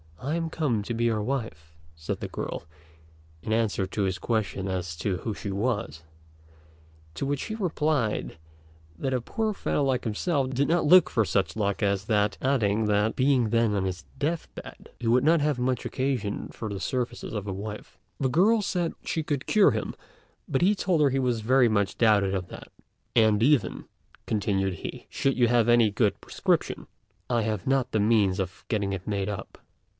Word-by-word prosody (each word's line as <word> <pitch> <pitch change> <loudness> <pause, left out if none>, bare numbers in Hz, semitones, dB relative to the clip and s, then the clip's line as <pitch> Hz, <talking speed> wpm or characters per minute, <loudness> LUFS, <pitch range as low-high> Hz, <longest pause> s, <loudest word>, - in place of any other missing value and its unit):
"I 145 +5 -2
am 165 -1 -2
come 145 -10 0
to 120 - -4
be 120 +1 0
your 110 -2 +1
wife," 105 - -4 0.2
said 80 0 -5
the - - -3
girl, - - -5 0.8
in - - -4
answer 110 -4 +1
to 100 +1 -2
his 95 -1 -1
question 95 -4 -2
as 90 -3 -3
to 90 +3 -1
who 110 +3 -4
she 100 - -5
was; 100 - -2 1.1
to - - -3
which 140 0 -1
he 220 - -4
replied 155 - -1 0.6
that 130 +9 -2
a 125 - -1
poor 220 - -2
fellow 145 - -1
like 130 -2 +1
himself 130 - 0
did 135 +2 +1
not 170 +1 +2
look 180 +4 +7
for 110 - +1
such 95 -1 0
luck 100 -2 -1
as 100 0 +1
that; 105 -2 +1
adding 110 -5 +1
that, 105 +1 +1
being 130 -4 +3
then 115 -2 +2
on 95 -1 0
his 90 -5 -4
death 155 +4 -1
bed, - - -10
he 120 - -3
would 125 +3 +4
not 160 +1 +4
have 145 -3 +1
much 125 0 -1
occasion 130 -6 -2
for 110 - -6
the 100 - -4
services 120 +4 -3
of 105 -2 -3
a 100 - -3
wife. 105 +2 -7 0.2
The 135 - +1
girl 205 - +4
said 180 -4 -1
she 160 - -1
could 145 -3 -2
cure 210 -2 +5
him; - - -3 0.5
but 140 -7 0
he 200 +3 +5
told 185 -5 +1
her 145 - +5
he 135 - -1
very 125 0 +3
much 100 -3 0
doubted 100 -5 +2
that; - - -10 0.5
"And 110 -2 +4
even," 145 0 +2 0.4
continued 95 -3 0
he, - - -8
"should 135 -1 0
you 120 -1 +4
have 120 -1 +3
any 120 -3 +5
good 105 0 +1
prescription, - - -1 0.4
I 120 -2 +2
have 110 -1 -3
not 135 -2 +1
the 110 - +1
means 105 -3 +3
of 95 -1 -5
getting 100 -3 -1
it 95 -1 -6
made 100 -1 -1
up." 105 - -6
115 Hz, 190 wpm, -27 LUFS, 100-135 Hz, 1.1 s, look